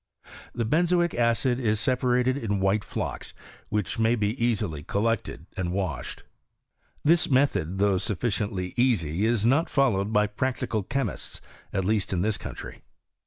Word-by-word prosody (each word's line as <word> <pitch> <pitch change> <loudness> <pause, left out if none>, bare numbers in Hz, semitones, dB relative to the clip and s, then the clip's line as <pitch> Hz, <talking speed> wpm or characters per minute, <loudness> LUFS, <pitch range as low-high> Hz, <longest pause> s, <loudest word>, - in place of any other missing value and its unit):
The 120 -1 -1
benzoic 175 +6 +2
acid 120 +1 +2
is 110 -4 +1
separated 125 0 +2
in 105 -7 -1
white 95 +2 +2
flocks, - - -5 0.3
which 105 -1 -1
may 115 +1 +3
be 105 -2 0
easily 105 -10 0
col 100 +7 -2
lected 115 -1 -1
and 90 -2 -2
washed. 90 -8 -3 0.8
This 165 +3 +4
method, 100 - +2
though 100 -1 +3
sufficiently 100 -2 -2
easy, 105 - +2
is 115 -2 +1
not 140 +8 +3
followed 110 -8 +2
by 105 -1 +4
practical 110 0 -2
chemists, 135 +7 -3 0.3
at 95 -2 -1
least 105 -1 0
in 90 -1 0
this 110 0 0
country. - - -8
110 Hz, 145 wpm, -26 LUFS, 100-125 Hz, 0.8 s, This